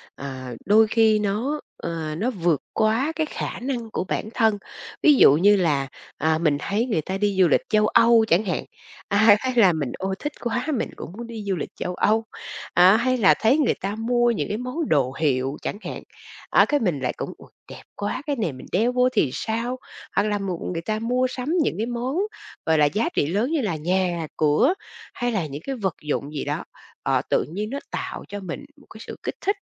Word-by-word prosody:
ờ, 130 -3 -7
đôi 215 +3 +5
khi 220 -1 +4
nó, 215 +9 -1 0.2
ơ, 160 -2 -4
nó 220 +8 0
vượt 170 - 0
quá 225 +8 +2
cái 315 - 0
khả - - -4
năng 245 -3 -3
của - - -1
bản 205 - -3
thân, 220 -3 +2 0.5
ví 300 - +7
dụ 255 - +7
như 200 +7 +5
là, 150 -8 +1 0.3
ờ, 160 0 +2
mình 155 -4 +2
thấy 205 +8 -1
người 215 -11 0
ta 190 +5 -4
đi 200 -1 0
du 180 - +6
lịch - - +3
châu 215 0 +3
Âu 230 0 +5
chẳng 190 +3 +3
hạn, 180 -4 -2 0.4
à, 200 - +1 0.2
hay 260 +1 -2
là 200 -7 +6
mình 145 -6 -2
"Ôi! 190 0 -2
Thích 295 0 -4
quá, 240 +3 -2
mình - - -2
cũng - - -8
muốn 235 0 -6
đi 225 -2 -7
du 195 -2 -1
lịch 165 - -4
châu 180 0 -4
Âu." 220 +4 +2 0.5
À, 185 +4 +7
hay 255 +2 +1
là 205 -5 +6
thấy 230 +6 +4
người 295 -5 +3
ta 200 +2 -2
mua 240 +2 +2
những 230 - -2
cái 210 - -2
món 255 +6 -3
đồ 135 -4 +2
hiệu 135 -3 +1
chẳng - - -3
hạn, - - -6 0.5
á, - - +5
cái 290 - +1
mình 180 - 0
lại 130 - -1
cũng - - -5
"Ôi, - - -16 0.2
đẹp - - -10
quá! 205 +5 -3
Cái 290 - 0
này 215 - -1
mình 130 - -11
đeo 225 +6 +2
vô 250 0 +3
thì 210 - +2
sao?", 230 - -2 0.4
hoặc 200 - +3
là 210 -1 0
m 195 -1 -4 0.3
người 165 - -3
ta 215 +5 -2
mua 250 +3 +1
sắm 255 +2 -5
những - - -1
cái 220 - 0
món, 245 +5 -3 0.5
gọi 160 0 +3
là, 150 - +5
giá 210 +10 0
trị 145 - +2
lớn 210 - 0
như 320 -3 +1
là 200 -8 -1
nhà 175 0 0
cửa 150 - +3 0.4
hay 245 0 -1
là 195 -7 -1
những 145 0 -7
cái 270 - -3
vật 195 -8 -2
dụng 150 0 -3
gì 145 - -3
đó, - - -2 0.4
ờ, - - +2
tự - - +2
nhiên 205 +7 -5
nó 280 +3 -3
tạo - - -4
cho 205 - -6
mình 200 +9 -6 0.2
một - - -20
cái 220 - -12
sự - - -6
kích - - -3
thích. 400 - +1
210 Hz, 230 wpm, -24 LUFS, 165-240 Hz, 0.5 s, ví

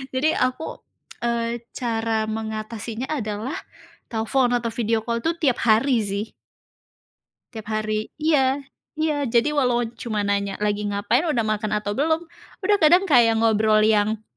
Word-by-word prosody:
Jadi 305 +5 +2
aku, 255 +5 -2 0.4
eee, 235 0 -1
cara 225 -2 -1
mengatasinya 220 +2 -4
adalah 225 0 -3 0.6
telepon 245 +3 +1
atau 235 -1 -2
video 225 -1 0
call 235 0 -1
itu 325 - +2
tiap 260 -6 +2
hari 235 +3 +4
sih. 200 +2 -3 1.3
Tiap 220 -3 -8
hari 215 0 -2
iya, 285 -3 +2 0.3
iya. 300 -3 0
Jadi 235 +5 +2
walau 250 -5 +2 0.2
cuma 215 -3 -2
nanya 200 -1 -1
lagi 210 0 0
ngapain, 205 +11 +1
sudah 245 -7 +1
makan 215 0 -2
atau 210 -1 -1
belum, 320 +3 +1 0.4
sudah 410 +2 +3
kadang 345 +3 +6
kayak 235 -4 +6
ngobrol 215 -1 +4
yang 215 0 +2
230 Hz, 140 wpm, -23 LUFS, 215-265 Hz, 1.3 s, kadang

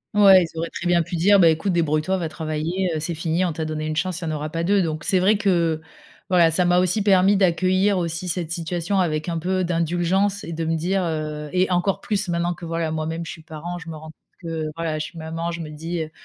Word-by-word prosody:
Ouais, 195 -3 +7
ils 165 -1 -8
auraient 165 - -2
très - - -7
bien 175 -1 +3
pu 170 +2 -4
dire: 195 +4 +5
«Beh, 170 -3 +7
écoute, 180 +4 -1
débrouille 155 -3 +1
toi, 190 +4 0
va 170 -3 -3
travailler, 160 +4 -2
heu, 155 - -1
c'est 165 +2 -3
fini, 165 +2 0
on 175 - -1
t'a 160 0 -4
donné 155 0 -3
1 155 - -2
chance, 180 +2 -2
il - - -4
y - - -3
en - - -2
aura 150 0 -4
pas 165 +1 -2
2». 195 +2 +3
Donc 155 -2 -3
c'est 190 - +2
vrai 200 +3 +3
que, 170 -5 +1 0.5
voilà, 175 -3 +5
ça 180 +3 +2
m'a 175 0 +3
aussi 180 +3 +2
permis 195 0 +4
d'accueillir 185 +1 +2
aussi 170 0 -3
cette 170 -2 -3
situation 175 +2 -1
avec 155 -3 0
un 170 -1 -1
peu 185 +2 0
d'indulgence 175 +4 0
et 170 - -6
de 165 0 -3
me 165 +1 0
dire, 185 +4 0
heu 155 -2 -3
et 185 +1 +2
encore 180 +2 +1
plus 205 -3 -2
maintenant 170 +1 0
que, 175 - -15
voilà 165 -1 -2
moi-même, 160 +1 -3
je - - -6
suis - - -10
parent, 160 +3 -7
je 165 -1 -10
me 160 - -6
rends 155 0 -10
compte - - -27 0.4
que, 160 -1 -2
voilà, 165 -2 -2
je 155 - -2
suis 170 - -11
maman, 165 +1 -4
je 170 0 -5
me 155 - -7
dis, 165 +2 -4
heu,: 155 - -9
170 Hz, 265 wpm, -23 LUFS, 160-185 Hz, 0.5 s, Ouais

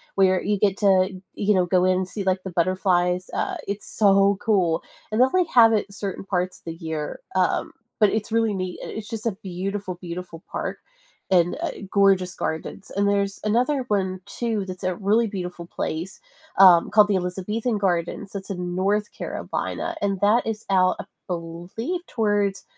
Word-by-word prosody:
where 190 -1 +4
you 205 -1 0
get 200 -1 +2
to, 190 -2 +3
you 210 +1 +1
know, 180 - +3
go 180 0 +2
in 185 0 +3
and 185 0 -1
see, 200 +1 -4
like, 185 0 0
the 190 - -5
butterflies, 180 0 +1
uh, - - -1
it's 200 0 -4
so 200 -1 +4
cool, 185 -8 +1 0.3
and 215 - 0
they 255 - +8
only 360 +7 +2
have 225 -2 +7
it 205 -1 0
certain 195 0 -5
parts 185 -1 -2
the 165 - -4
year, 160 -3 -5 0.2
um, 185 -1 +1 0.3
but 210 -2 +6
it's 220 0 -2
really 225 -2 +2
neat. 185 -2 -4
Uh, - - -7
it's 220 0 -6
just 225 -1 -5
a 230 - +2
beautiful, 190 0 -4
beautiful 175 -1 -7
park - - -3 0.5
and 175 -1 +4
uh, - - -1 0.2
gorgeous 195 -2 +3
gardens, 160 +4 -4
and 200 0 +2
there's 200 -1 0
another 250 +5 +1
one 190 -2 0
too 225 -4 -2
that's 185 0 -7
a 185 -1 0
really 215 +4 +2
beautiful 180 -4 -5
place, 170 +4 -4 0.4
um, 180 -3 +8
called 210 -1 +6
the 205 - +1
Elizabethan 195 +6 -1
Gardens. 180 0 -1
It's 195 0 -6
in 180 -2 -3
North 205 +3 +1
Carolina, 340 - -4
and 195 -2 0
that 215 +3 +3
is 220 -1 -3
out, 185 -1 +4
I - - -4 0.2
believe, 175 - -4
towards, 205 -3 0
195 Hz, 180 wpm, -24 LUFS, 180-210 Hz, 0.5 s, they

